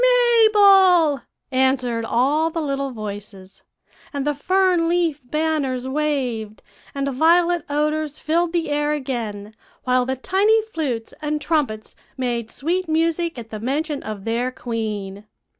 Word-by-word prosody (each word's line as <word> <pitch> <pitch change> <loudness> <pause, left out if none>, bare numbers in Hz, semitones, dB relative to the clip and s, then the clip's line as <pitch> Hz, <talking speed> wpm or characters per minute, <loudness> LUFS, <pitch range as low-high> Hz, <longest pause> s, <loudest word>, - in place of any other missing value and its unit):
"'Mabel,' 410 - +5 0.3
answered 255 -3 +1
all 285 +8 +2
the 330 - -4
little 275 -2 -2
voices; 205 -4 -8 0.5
and 280 -2 -3
the 295 - +1
fern 360 +2 +2
leaf 335 -4 0
banners 275 -2 -1
waved, 260 -7 -2 0.3
and 275 0 -1
violet 340 +4 +3
odors 300 0 -1
filled 335 +2 0
the 335 -3 -1
air 295 +1 +1
again, 225 -7 -4 0.3
while 255 0 +1
the 265 - -1
tiny 395 - +2
flutes 290 - -4
and 300 0 -1
trumpets 280 -10 -2 0.2
made 240 -3 -2
sweet 350 +8 -2
music 330 0 0
at 225 -2 -9
the 215 - -5
mention 285 +5 -2
of 210 -3 -7
their 235 +2 0
queen. 215 -5 -5
290 Hz, 130 wpm, -21 LUFS, 240-330 Hz, 0.5 s, Mabel